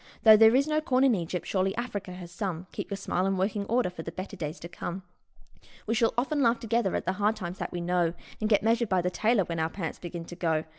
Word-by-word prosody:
Though 220 -1 +10
there 220 +2 +7
is 275 +2 +4
no 310 0 +1
corn 265 -4 +2
in 265 -3 +5
Egypt, 180 -2 -3
surely 190 0 0
Africa 205 -6 -4
has 180 -1 -9
some 175 -2 -4
Keep - - -5
your 200 - -3
smile 185 -1 -1
in 195 0 0
working 200 +2 -1
order 235 -5 +1
for 170 - -7
the 165 - -6
better 190 +3 -7
days 155 -2 -5
to 170 - -6
come! 175 +2 -6 0.8
We 225 - 0
shall 230 0 +2
often 285 +4 +1
laugh 235 -2 +3
together 230 -3 0
at - - -2
the 185 - +1
hard 210 +2 +3
times 175 -1 -6
that - - -4
we 175 - -4
know, 175 -1 +1 0.2
And 215 - -1
get 205 -2 +4
measured 230 0 +2
by 185 -2 +2
the 180 - 0
tailor 220 +1 +2
when 170 -1 -4
our 160 0 +1
pants 165 -2 -5
begin 170 -1 -6
to 175 - -9
go. 160 -3 0
195 Hz, 260 wpm, -28 LUFS, 175-225 Hz, 0.8 s, Though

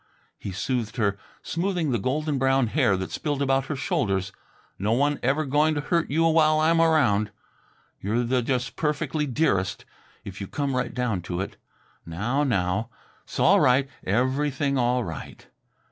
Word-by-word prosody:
he 100 - -5
soothed 115 +3 -2
her, 100 -3 +1 0.3
smoothing 175 -3 -1
the 120 - +1
golden 145 +5 -1
brown 135 0 +3
hair 115 -5 +2
that 95 0 -5
spilled 145 -2 -2
about 135 -1 +1
her 150 - -2
shoulders. 95 -7 -1 0.5
"No 105 +4 +1
one 145 +4 +1
ever 140 +5 +1
going 150 +3 +2
to 145 - -1
hurt 170 +2 0
you 160 +4 +2
while 155 -1 +4
I'm 165 +1 +3
around. 125 -11 +3 0.7
You're 110 +5 0
the 125 +1 +1
just 130 +2 -2
perfectly 150 0 -1
dearest, 100 -9 0 0.4
if 95 +1 -8
you 100 - -4
come 140 +2 -2
right 125 -1 -1
down 120 -7 -1
to 85 - -2
it. 95 - -4 0.5
Now, 105 - -1
now! 105 -3 0 0.4
'S - - -7
all - - +5
right. 130 +2 +4 0.2
Everything 135 +6 0
all 125 -1 +1
right!" 80 -6 -8
130 Hz, 160 wpm, -25 LUFS, 105-150 Hz, 0.7 s, all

